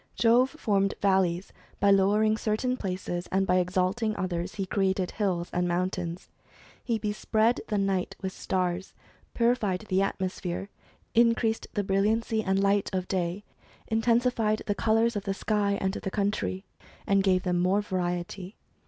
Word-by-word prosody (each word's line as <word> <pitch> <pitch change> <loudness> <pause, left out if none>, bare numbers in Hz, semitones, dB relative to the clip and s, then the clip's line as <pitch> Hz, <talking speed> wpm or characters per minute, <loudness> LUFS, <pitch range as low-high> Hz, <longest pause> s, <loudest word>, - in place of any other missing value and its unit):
Jove 240 +3 +4
formed 200 -10 0
valleys 190 -2 +1 0.3
by 200 0 +4
lowering 205 +3 +4
certain 220 +4 -1
places; 180 -4 -4
and 190 +1 +2
by 185 0 +3
exalting 185 +5 0
others 180 -1 -3
he 195 - -2
created 190 -1 0
hills 180 -5 -1
and 180 0 +1
mountains. 175 0 -2 0.6
He 230 -2 0
bespread 215 +2 +1
the 210 - -1
night 195 -2 0
with 190 -1 -4
stars; 185 0 -2 0.4
purified 230 -6 +1
the 190 0 +2
atmosphere; 190 -1 -3 0.4
increased 230 -1 +2
the 205 - +1
brilliancy 215 +3 +1
and 190 0 +1
light 200 0 +2
of 185 -1 -2
day; 185 +1 -2 0.5
intensified 225 -1 +1
the 205 - 0
colours 225 +3 +2
of 205 - -3
the 195 -1 -1
sky 205 -1 0
and 190 0 -1
the 195 - -4
country, 200 -1 -2 0.4
and 195 0 +3
gave 185 -2 +2
them 180 -1 0
more 190 +3 +2
variety. 180 0 -3
195 Hz, 145 wpm, -28 LUFS, 185-215 Hz, 0.6 s, Jove